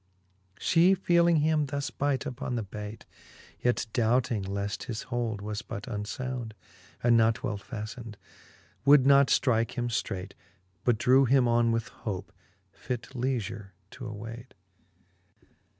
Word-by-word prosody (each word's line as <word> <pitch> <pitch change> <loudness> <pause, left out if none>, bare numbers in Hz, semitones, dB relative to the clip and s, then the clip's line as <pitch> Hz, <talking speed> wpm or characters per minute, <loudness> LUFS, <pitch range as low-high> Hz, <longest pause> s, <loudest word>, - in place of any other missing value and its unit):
She 175 +3 +4
feeling 170 -3 +3
him 155 -1 +2
thus 140 0 -3
bite 140 -1 -1
upon 125 0 -4
the 115 - -1
bayt, 105 +2 -8 0.5
Yet 120 -1 +1
doubting 120 -1 +2
leaft 100 +2 -3
his 110 -3 -4
hold 120 -4 -2
was 105 +1 -4
but 100 -3 -7
unlbund, 115 +2 -4 0.5
And 120 0 +5
not 115 0 +3
well 110 -6 -2
faftened, 110 0 -7 0.7
would 140 -1 +6
not 140 0 +6
ftrike 115 -4 +2
him 120 -1 -2
ftrayt, 100 -4 -3 0.5
But 120 -3 +3
drew 130 +4 +5
him 130 0 +4
on 120 0 +3
with 115 0 -1
hope, 100 -3 -6 0.4
fit 125 -2 -5
leafure 115 -6 -3 0.2
to 125 0 -9
awayt. 115 +3 -8
120 Hz, 135 wpm, -28 LUFS, 110-130 Hz, 0.7 s, would